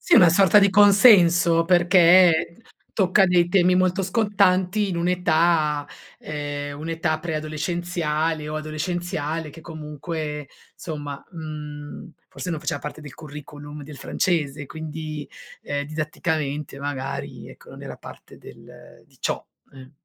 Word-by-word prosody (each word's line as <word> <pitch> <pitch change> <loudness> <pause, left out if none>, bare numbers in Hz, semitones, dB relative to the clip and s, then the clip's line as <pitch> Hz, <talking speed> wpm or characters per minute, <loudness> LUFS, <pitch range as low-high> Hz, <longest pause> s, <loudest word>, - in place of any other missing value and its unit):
Sì, - - +3
è - - +8
una 175 - +8
sorta 195 +3 +5
di 200 -1 +5
consenso 190 -5 +6
perché 175 -1 +5 0.4
tocca 195 0 +3
dei 175 -1 +3
temi 180 -1 +3
molto 185 +1 +1
scottanti 200 -1 +1
in 180 - -3
un'età 165 -4 +1 0.3
ehm, 145 -1 -5
un'età 160 0 -2
preadolescenziale 155 0 -2
o 155 - -4
adolescenziale, 155 0 -3
che 165 - -13
comunque, 150 -2 -6 0.3
insomma, 145 -3 -7
mhmm, 150 -1 -8 0.2
forse 180 - -6
non 165 - -2
faceva 145 - -3
parte 150 +1 -7
del 145 -3 -11
curriculum 145 -1 -10
del 145 0 -10
francese, 145 -5 -1
quindi, 155 0 -7 0.3
ehm, 145 0 -3
didatticamente 155 -2 -3
magari, 140 -1 -5
ecco, - - -16
non - - -11
era - - -8
parte - - -13
del - - -15
di - - -26
ciò, - - -2 0.3
eh. 130 -1 -13
160 Hz, 130 wpm, -23 LUFS, 150-175 Hz, 0.4 s, è